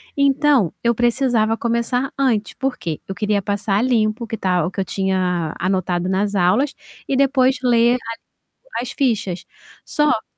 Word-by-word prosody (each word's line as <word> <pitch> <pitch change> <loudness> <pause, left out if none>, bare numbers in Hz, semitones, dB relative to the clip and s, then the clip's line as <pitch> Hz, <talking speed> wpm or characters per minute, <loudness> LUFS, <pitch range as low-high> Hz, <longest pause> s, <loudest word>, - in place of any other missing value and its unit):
Então, 280 - +3
eu 235 0 +3
precisava 235 -2 +1
começar 235 +3 -1
antes. 230 -6 +1
Por 270 -1 -2
quê? 160 -3 -5
Eu 195 - -5
queria 205 0 0
passar 200 0 -1
a - - +1
limpo 235 -2 +1
o - - -15
que 225 - -4
tá 180 -3 +1
o - - -1
que - - -6
eu 190 - 0
tinha 180 -4 -1
anotado 180 -1 -1
nas 200 +2 0
aulas 195 +11 +2 0.3
e 270 - 0
depois 265 -1 +3
ler 240 0 +4
a - - 0 0.8
as 250 - -5
fichas. 215 -9 -1 0.4
Só 295 -7 +1
225 Hz, 170 wpm, -20 LUFS, 190-255 Hz, 0.8 s, ler